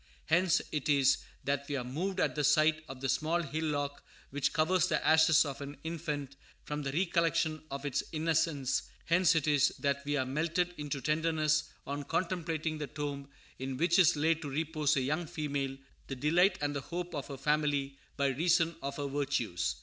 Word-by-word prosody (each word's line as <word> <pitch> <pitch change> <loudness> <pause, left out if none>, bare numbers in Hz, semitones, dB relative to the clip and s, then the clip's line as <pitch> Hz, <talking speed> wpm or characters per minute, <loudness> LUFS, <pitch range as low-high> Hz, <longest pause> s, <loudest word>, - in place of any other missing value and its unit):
Hence 175 +2 +3
it 150 0 -2
is 140 -2 +4 0.3
that 140 +1 -1
we 145 - -1
are 130 - -2
moved 180 +10 -3
at - - +2
the 150 - -1
sight 155 +2 +4
of 130 -1 -8
the 135 - -1
small 165 +5 +1
hillock 145 -1 -2 0.3
which 140 0 0
covers 175 +3 +2
the 160 - 0
ashes 160 0 +6
of 140 -1 -5
an 140 +1 -7
infant, 150 -4 -4 0.3
from 150 0 -4
the 140 -1 -3
recollection 165 -1 +1
of 140 +1 -5
its 140 - 0
innocence; 155 -4 +1 0.2
hence 170 +1 +4
it 155 -2 +1
is 145 -2 +4
that 140 -1 -1
we 145 +1 -1
are 130 - 0
melted 165 +6 0
into 145 -2 -3
tenderness 155 +1 +1 0.2
on 140 +1 -3
contemplating 165 -2 -2
the 150 - -3
tomb 140 -1 -5 0.3
in 130 0 -4
which 170 +4 +3
is 180 -2 +6
laid 160 +2 +1
to 145 - -5
repose 155 0 0
a - - +2
young 155 +6 -1
female, 140 -3 -3 0.3
the 135 - -4
delight 175 +8 +3
and 145 0 -1
the 140 - -2
hope 175 +4 -5
of 145 -3 -4
her 140 - -7
family 145 -1 0 0.2
by 140 - +1
reason 165 +4 +2
of 140 0 -4
her 145 - -2
virtues. 130 - -1
150 Hz, 190 wpm, -31 LUFS, 140-165 Hz, 0.3 s, ashes